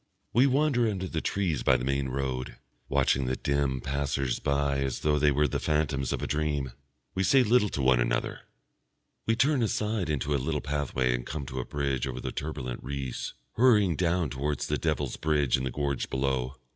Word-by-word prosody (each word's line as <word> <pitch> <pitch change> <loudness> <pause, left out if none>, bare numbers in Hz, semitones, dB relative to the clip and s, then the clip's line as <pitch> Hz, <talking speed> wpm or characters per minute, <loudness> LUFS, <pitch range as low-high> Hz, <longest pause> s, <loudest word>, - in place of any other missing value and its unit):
We 125 +5 +5
wander 135 -4 +2
under 95 -2 -3
the 80 -3 -3
trees 90 -9 -1
by 65 - +4
the 60 - -4
main 70 0 0
road, 65 -1 -3 0.3
watching 70 -1 +2
the 65 - 0
dim 70 -2 0
passers 70 -2 -1
by 70 0 +1
as 65 -2 -2
though 75 -1 +2
they 75 0 +4
were 75 +1 +3
the - - -2
phantoms 75 -3 0
of - - -2
a - - -1
dream. 75 -3 -1 0.4
We 95 - -1
say 130 +8 +5
little 110 -2 +3
to 70 - -2
one 65 -1 +4
another. - - 0 0.9
We 115 - +3
turn 135 +3 +3
aside 105 -4 0
into 75 0 0
a 70 - +1
little 75 +2 -1
pathway 70 -4 0
and - - -2
come 75 +2 -5
to 65 -1 -5
a 60 - -3
bridge 70 -2 -1
over 65 -1 -4
the - - -4
turbulent 70 -5 -4
Reuss, 70 -2 -4 0.2
hurrying 105 -8 +4
down 85 -4 +1
towards 70 +2 -2
the - - -1
Devil's - - -1
Bridge 75 -4 +2
in 65 -1 -2
the - - -1
gorge 70 -1 -2
below. 65 -1 -1
70 Hz, 195 wpm, -28 LUFS, 65-80 Hz, 0.9 s, We